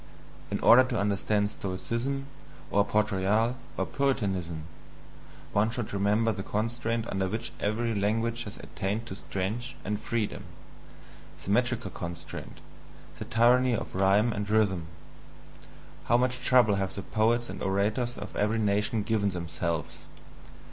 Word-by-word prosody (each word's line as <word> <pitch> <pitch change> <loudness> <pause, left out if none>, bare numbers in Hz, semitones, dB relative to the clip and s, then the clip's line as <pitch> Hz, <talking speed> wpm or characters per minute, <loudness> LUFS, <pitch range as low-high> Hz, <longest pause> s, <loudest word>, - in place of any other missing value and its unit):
In - - -2
order 125 +3 +8
to 125 -4 -1
understand 100 +1 +1
Stoicism, 115 +8 -3 0.5
or 100 - +4
Port 105 +2 +1
Royal, 105 +5 +2 0.2
or - - +1
Puritanism, 95 - -1 0.9
one 105 +2 +3
should 120 -3 -4
remember 105 +3 +2
the 95 - -4
constraint 115 +2 -1
under 95 -1 -1
which 110 +4 -3
every 115 +3 0
language 115 +3 0
has 105 - -8
attained 105 +4 -3
to 105 - -6
strength 110 +7 -3
and 105 +1 -1
freedom 115 -3 -2 1.0
the 100 - -1
metrical 120 -2 +1
constraint, 85 -1 -7 0.6
the - - -4
tyranny 120 +2 +4
of - - -5
rhyme 100 +4 +3
and 105 -1 -3
rhythm. 100 -6 +2 1.2
How 120 - +4
much 125 +1 +1
trouble 120 -6 +5
have 95 - -2
the 100 - -5
poets 120 +2 +1
and - - -7
orators 105 +6 0
of - - -7
every 105 +2 +1
nation 105 +1 +1
given 105 -2 +1
themselves! 85 -2 -3
105 Hz, 135 wpm, -29 LUFS, 100-115 Hz, 1.2 s, order